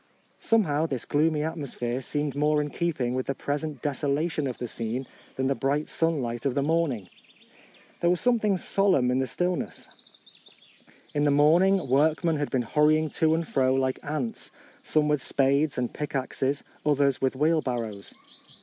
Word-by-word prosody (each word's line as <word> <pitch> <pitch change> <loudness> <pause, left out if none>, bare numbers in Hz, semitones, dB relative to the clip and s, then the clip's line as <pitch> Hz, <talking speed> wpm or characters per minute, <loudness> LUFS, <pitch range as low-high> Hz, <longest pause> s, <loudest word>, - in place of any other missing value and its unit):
Somehow 165 -9 +2
this 130 -6 -4
gloomy 150 0 +1
atmosphere 135 -6 -3
seemed 145 +1 -3
more 150 +1 +2
in 150 0 -2
keeping 145 -8 -1
with 130 0 -2
the 135 - -1
present 150 +2 -4
deso 145 0 -1
lation 150 -1 0
of 125 - -6
the 120 - -4
scene 115 +4 -4 0.3
than 130 0 -1
the 135 - +2
bright 140 +3 -1
sunlight 130 -8 -1
of 135 -3 0
the 140 - +1
morning. 145 - 0 0.9
There 170 - +2
was 180 0 +2
something 220 -5 +2
solemn 180 -10 +2
in 130 - +1
the 130 - 0
still 175 +8 0
ness. - - -7 1.2
In 145 - +1
the 145 - +3
morning 170 +7 +4
workmen 155 +4 +2
had 145 -1 -2
been 130 -2 0
hurrying 155 +4 +2
to 160 0 +4
and 165 -1 -2
fro 130 -1 +2
like 130 -1 0
ants, 155 +10 -4 0.3
some 155 - +1
with 150 -2 +1
spades 140 +3 +1
and 125 -1 -2
pick 150 -1 -5
axes, 135 +1 -1 0.2
others 140 -2 +2
with 130 0 +1
wheelbarrows. 125 -9 -1
145 Hz, 170 wpm, -26 LUFS, 130-160 Hz, 1.2 s, morning